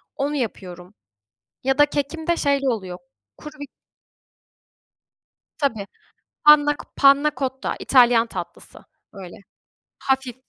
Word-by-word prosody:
Onu 290 Hz, +1 st, -2 dB
yapıyorum 185 Hz, -7 st, -6 dB, 0.7 s
ya 270 Hz, +1 st, 0 dB
da 290 Hz, -, +6 dB
kekimde 315 Hz, +4 st, -3 dB
şeyli 280 Hz, -2 st, 0 dB
oluyor: 190 Hz, -7 st, -4 dB, 0.4 s
Kuru 300 Hz, 0 st, -12 dB
bir 285 Hz, -, -7 dB, 1.9 s
Tabii. 225 Hz, -9 st, -2 dB, 0.6 s
Panna 295 Hz, -1 st, +6 dB
Co -, -, -12 dB
Panna 280 Hz, +2 st, +4 dB
Cotta 265 Hz, -1 st, -3 dB
İtalyan 240 Hz, -3 st, +4 dB
tatlısı 180 Hz, -6 st, -9 dB, 0.3 s
böyle. 190 Hz, -3 st, -11 dB, 0.6 s
Hafif 265 Hz, -2 st, -2 dB
270 Hz, 105 wpm, -21 LUFS, 225-290 Hz, 1.9 s, da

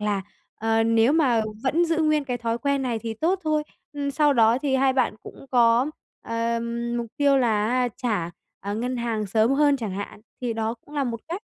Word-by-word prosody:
là, 205 Hz, -2 st, -1 dB, 0.3 s
ờ, 225 Hz, 0 st, +1 dB
nếu 230 Hz, +4 st, +4 dB
mà 255 Hz, -8 st, +3 dB, 0.2 s
vẫn 325 Hz, +6 st, +2 dB
giữ 330 Hz, -1 st, 0 dB
nguyên 305 Hz, -2 st, +2 dB
cái 250 Hz, -2 st, -3 dB
thói 230 Hz, 0 st, -2 dB
quen 280 Hz, +1 st, 0 dB
này 240 Hz, -3 st, -1 dB
thì 225 Hz, 0 st, -5 dB
tốt 350 Hz, -, 0 dB
thôi, 305 Hz, -1 st, +1 dB, 0.3 s
ưm, 285 Hz, -1 st, -2 dB
sau 295 Hz, 0 st, +3 dB
đó 230 Hz, 0 st, +4 dB
thì 270 Hz, -1 st, 0 dB
hai 265 Hz, 0 st, +3 dB
bạn 260 Hz, -4 st, +1 dB
cũng 275 Hz, -, -12 dB
có, 240 Hz, +1 st, +4 dB, 0.4 s
ờ, 230 Hz, 0 st, -1 dB, 0.4 s
mục 235 Hz, -, -3 dB
tiêu 280 Hz, -1 st, +4 dB
là 220 Hz, -4 st, +2 dB
á 250 Hz, 0 st, +1 dB
trả, 205 Hz, -9 st, -1 dB, 0.3 s
à, 200 Hz, +1 st, -4 dB
ngân 250 Hz, +3 st, -2 dB
hàng 230 Hz, -3 st, -2 dB
sớm 220 Hz, +4 st, +2 dB
hơn 285 Hz, 0 st, +4 dB
chẳng 220 Hz, -7 st, -4 dB
hạn, 200 Hz, +1 st, -6 dB, 0.2 s
thì 245 Hz, -2 st, -1 dB
đó 225 Hz, +1 st, -2 dB
cũng 290 Hz, +5 st, -17 dB
là 285 Hz, -, 0 dB
một 230 Hz, -3 st, -3 dB
cách. 350 Hz, +5 st, -4 dB
245 Hz, 215 wpm, -24 LUFS, 225-280 Hz, 0.4 s, nếu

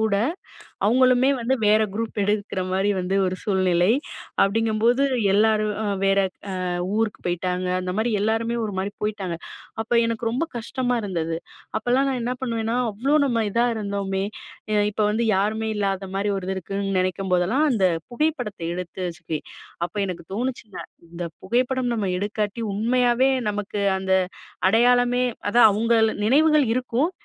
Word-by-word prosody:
கூட. 220 Hz, -2 st, +2 dB, 0.7 s
அவுங்களுமே 255 Hz, +3 st, +4 dB
வந்து 245 Hz, +3 st, +1 dB
வேறு 215 Hz, +1 st, +5 dB
குரூப் 225 Hz, +1 st, -3 dB
எடுக்குற 200 Hz, -2 st, -1 dB
மாரி 195 Hz, +2 st, +1 dB
வந்து 185 Hz, +1 st, -1 dB
ஒரு 185 Hz, 0 st, -2 dB
சூழ்நிலை. 185 Hz, -3 st, +2 dB, 0.5 s
அப்பிடிங்கம்போது, 225 Hz, +4 st, +2 dB, 0.3 s
எல்லாரும் 215 Hz, 0 st, +3 dB
அ -, -, -2 dB, 0.2 s
வேற 195 Hz, 0 st, +3 dB, 0.4 s
அ -, -, -2 dB, 0.3 s
ஊருக்கு 225 Hz, -1 st, -1 dB
போயிட்டாங்க. 180 Hz, +1 st, -1 dB
அந்தமாரி 190 Hz, +6 st, -1 dB
எல்லாருமே 225 Hz, +2 st, 0 dB
ஒருமாரி 200 Hz, -1 st, -3 dB
போயிட்டாங்க. 200 Hz, -5 st, -2 dB, 0.5 s
அப்போ 240 Hz, +2 st, -2 dB
எனக்கு 230 Hz, 0 st, -1 dB
ரொம்ப 265 Hz, +8 st, -1 dB
கஷ்டமா 245 Hz, +1 st, -1 dB
இருந்தது. 165 Hz, -5 st, -2 dB, 0.4 s
அப்பல்லாம் 255 Hz, +4 st, +1 dB
நான் 255 Hz, -2 st, -2 dB
என்ன 245 Hz, +2 st, -1 dB
பண்ணுவேன்னா, 230 Hz, -2 st, -1 dB
அவ்ளோ 265 Hz, +9 st, +1 dB
நம்ம 235 Hz, -4 st, +1 dB
இதா 235 Hz, +4 st, +2 dB
இருந்தோமே! 200 Hz, -2 st, -2 dB, 0.5 s
அ -, -, +2 dB, 0.2 s
இப்ப 210 Hz, -, -5 dB
வந்து 225 Hz, +2 st, 0 dB
யாருமே 220 Hz, +3 st, 0 dB
இல்லாத 195 Hz, -1 st, -1 dB
மாரி 205 Hz, +1 st, 0 dB
ஒரு 185 Hz, -1 st, -5 dB
இது 190 Hz, -, -1 dB
இருக்குன்னு 195 Hz, +1 st, -3 dB
நினைக்கும்போதெல்லாம், 185 Hz, -, +1 dB
அந்த 205 Hz, -6 st, +1 dB, 0.3 s
புகைப்படத்த 250 Hz, -, -1 dB
எடுத்து 180 Hz, 0 st, -6 dB
வச்சுக்குவேன். 160 Hz, -2 st, -6 dB, 0.4 s
அப்போ 210 Hz, -, -18 dB
எனக்கு 175 Hz, -2 st, -6 dB
தோணுச்சுங்க, 235 Hz, -4 st, -4 dB, 0.3 s
இந்த 170 Hz, +1 st, -5 dB, 0.2 s
புகைப்படம் 250 Hz, +4 st, 0 dB
நம்ம 205 Hz, -4 st, -1 dB
எடுக்காட்டி 210 Hz, +2 st, -2 dB
உண்மையாவே 245 Hz, +4 st, +2 dB, 0.2 s
நமக்கு 205 Hz, 0 st, -3 dB, 0.2 s
அந்த 190 Hz, -, -7 dB, 0.6 s
அடையாளமே 245 Hz, +3 st, +4 dB, 0.3 s
அதான் 235 Hz, 0 st, +7 dB
அவுங்கள 220 Hz, +3 st, -1 dB, 0.4 s
நினைவுகள் 300 Hz, +5 st, +5 dB
இருக்கும், 255 Hz, +5 st, 0 dB
215 Hz, 140 wpm, -23 LUFS, 195-240 Hz, 0.7 s, அதான்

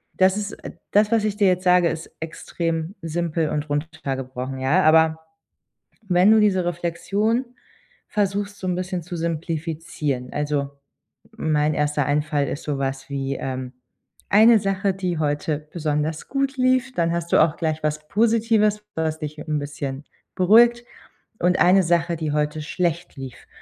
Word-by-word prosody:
Das 190 Hz, +1 st, +4 dB
ist 210 Hz, 0 st, -3 dB
äh, -, -, -6 dB, 0.2 s
das 210 Hz, +1 st, +3 dB
was 225 Hz, -2 st, +3 dB
ich 210 Hz, -1 st, -1 dB
dir 200 Hz, -3 st, +4 dB
jetzt 180 Hz, 0 st, +1 dB
sage, 180 Hz, -2 st, +5 dB
ist 165 Hz, 0 st, -6 dB
extrem 165 Hz, +2 st, -4 dB
simpel 165 Hz, -1 st, -1 dB
und 150 Hz, 0 st, -3 dB
runtergebrochen, 135 Hz, -4 st, -4 dB
ja? 150 Hz, +9 st, +2 dB
Aber 160 Hz, 0 st, +4 dB, 0.9 s
wenn 180 Hz, +3 st, +5 dB
du 220 Hz, -, +6 dB
diese 190 Hz, -4 st, +3 dB
Reflexion 195 Hz, +8 st, -1 dB, 0.6 s
versuchst, 205 Hz, 0 st, -1 dB
so 185 Hz, -, -6 dB
ein 180 Hz, -, +1 dB
bisschen 185 Hz, -1 st, -3 dB
zu 175 Hz, +2 st, -6 dB
simplifizieren. 160 Hz, -5 st, -3 dB
Also, 145 Hz, -1 st, -1 dB, 0.7 s
mein 150 Hz, -1 st, +1 dB
1. 150 Hz, -1 st, 0 dB
Einfall 145 Hz, -1 st, 0 dB
ist 140 Hz, -, -5 dB
sowas 135 Hz, -1 st, -3 dB
wie, 135 Hz, 0 st, -2 dB
ähm: 130 Hz, -1 st, -5 dB, 0.6 s
Eine 220 Hz, +2 st, +7 dB
Sache, 195 Hz, 0 st, 0 dB
die 180 Hz, -3 st, -2 dB
heute 150 Hz, 0 st, -1 dB
besonders 155 Hz, -1 st, -2 dB
gut 275 Hz, 0 st, -1 dB
lief, 255 Hz, 0 st, +2 dB
dann 170 Hz, -1 st, +1 dB
hast 170 Hz, 0 st, -3 dB
du -, -, +6 dB
auch 155 Hz, 0 st, +2 dB
gleich 160 Hz, -1 st, -2 dB
was 150 Hz, 0 st, -2 dB
Positives, 220 Hz, -1 st, +2 dB
was 160 Hz, -1 st, -1 dB
dich 150 Hz, 0 st, -6 dB
'n 150 Hz, -1 st, -2 dB
bisschen 145 Hz, -1 st, -5 dB, 0.3 s
beruhigt 235 Hz, +6 st, +5 dB, 0.5 s
und 180 Hz, +1 st, +2 dB
eine 190 Hz, +2 st, +6 dB
Sache, 170 Hz, 0 st, +1 dB
die 155 Hz, -2 st, -2 dB
heute 150 Hz, +1 st, -1 dB
schlecht 170 Hz, +2 st, -2 dB
lief. 135 Hz, -2 st, -9 dB
165 Hz, 150 wpm, -23 LUFS, 150-190 Hz, 0.9 s, Eine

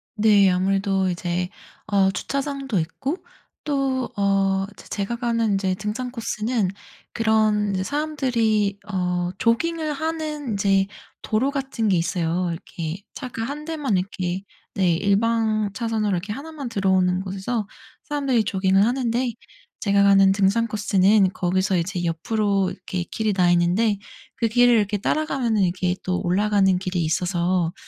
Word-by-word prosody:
네 205 Hz, -3 st, +5 dB
아무래도 195 Hz, +1 st, +1 dB
이제 175 Hz, 0 st, -2 dB, 0.4 s
어 195 Hz, -2 st, +3 dB
주차장도 275 Hz, -, -2 dB
있고 275 Hz, -, -3 dB, 0.5 s
또 270 Hz, -3 st, -1 dB
어 195 Hz, -1 st, +2 dB
제 -, -, -14 dB
제가 205 Hz, +3 st, -3 dB
가는 230 Hz, -3 st, 0 dB
인제 190 Hz, -1 st, 0 dB
등산 215 Hz, +6 st, -4 dB
코스는 225 Hz, -3 st, -1 dB, 0.4 s
그런 215 Hz, -2 st, +2 dB
인제 190 Hz, -1 st, -1 dB
사람들이 235 Hz, -9 st, 0 dB
어 180 Hz, -1 st, -1 dB
조깅을 310 Hz, +6 st, 0 dB
하는 310 Hz, -3 st, -3 dB
인제 195 Hz, -1 st, +2 dB, 0.3 s
도로 230 Hz, +6 st, +1 dB
같은 270 Hz, -6 st, -2 dB
게 190 Hz, -, +3 dB
있어요. 170 Hz, +1 st, 0 dB
이렇게 165 Hz, +2 st, -6 dB
차가 245 Hz, -4 st, -5 dB
1 295 Hz, +3 st, -5 dB
대만 295 Hz, -, -1 dB
이렇게 185 Hz, 0 st, -3 dB, 0.3 s
네 185 Hz, -4 st, +3 dB
일방 215 Hz, +2 st, +1 dB
차선으로 220 Hz, -2 st, -1 dB
이렇게 190 Hz, +3 st, -2 dB
1 305 Hz, +6 st, -8 dB
만 280 Hz, -5 st, -6 dB
들어오는 190 Hz, -3 st, +2 dB
곳에서 195 Hz, +3 st, -3 dB, 0.4 s
사람들이 275 Hz, -6 st, 0 dB
조깅을 195 Hz, 0 st, +2 dB
하는데 245 Hz, 0 st, 0 dB, 0.5 s
제가 200 Hz, -1 st, +3 dB
가는 195 Hz, -1 st, +6 dB
등산 200 Hz, +4 st, +2 dB
코스는 200 Hz, -1 st, +3 dB
거기서 185 Hz, +1 st, +1 dB
이제 175 Hz, +1 st, -2 dB
옆으로 195 Hz, +3 st, 0 dB
이렇게 180 Hz, -2 st, -4 dB
길이 215 Hz, +4 st, -2 dB
나 180 Hz, -2 st, +3 dB
있는데 180 Hz, +5 st, +2 dB, 0.4 s
그 230 Hz, 0 st, +1 dB
길을 245 Hz, +2 st, +5 dB
이렇게 205 Hz, -1 st, +1 dB
따라가면은 245 Hz, -3 st, 0 dB
이렇게 180 Hz, 0 st, 0 dB
또 185 Hz, -1 st, -1 dB
올라가는 195 Hz, 0 st, +2 dB
길이 185 Hz, -2 st, -2 dB
있어서 175 Hz, +1 st, 0 dB
205 Hz, 300 characters per minute, -23 LUFS, 185-235 Hz, 0.5 s, 가는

